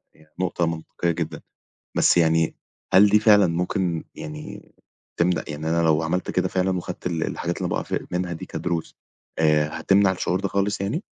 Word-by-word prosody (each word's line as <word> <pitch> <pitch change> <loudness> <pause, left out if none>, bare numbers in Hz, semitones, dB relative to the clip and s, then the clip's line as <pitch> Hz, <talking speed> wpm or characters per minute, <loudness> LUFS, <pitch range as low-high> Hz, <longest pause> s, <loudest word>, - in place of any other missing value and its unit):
يعني 80 0 -24
نقطة 90 -2 0
منطقية 85 +1 -2
جدًا، 80 -2 -4 0.6
بس - - +4
يعني 80 -1 +3 0.4
هل 100 +2 +8
دي 105 +1 +4
فعلًا 105 -3 +6
ممكن، 85 0 -1
يعني، 155 -1 -9 0.4
تمنع 85 +1 +1
يعني 75 +2 -4
أنا 85 0 +2
لو 80 -1 +3
عملت 85 +3 -1
كده - - 0
فعلًا، 95 0 0
وخدت 90 0 -7
ال 80 -2 -1
الحاجات - - -3
اللي - - -2
باقع - - -1
في - - -4
منها 90 0 -2
دي 80 - -6
كدروس، 85 -2 -4 0.4
آآ 75 -1 +3
هتمنع 95 +2 +4
الشعور 90 0 -1
ده 100 - -1
خالص 100 +1 -1
يعني؟ 115 - -2
90 Hz, 175 wpm, -24 LUFS, 80-95 Hz, 0.6 s, هل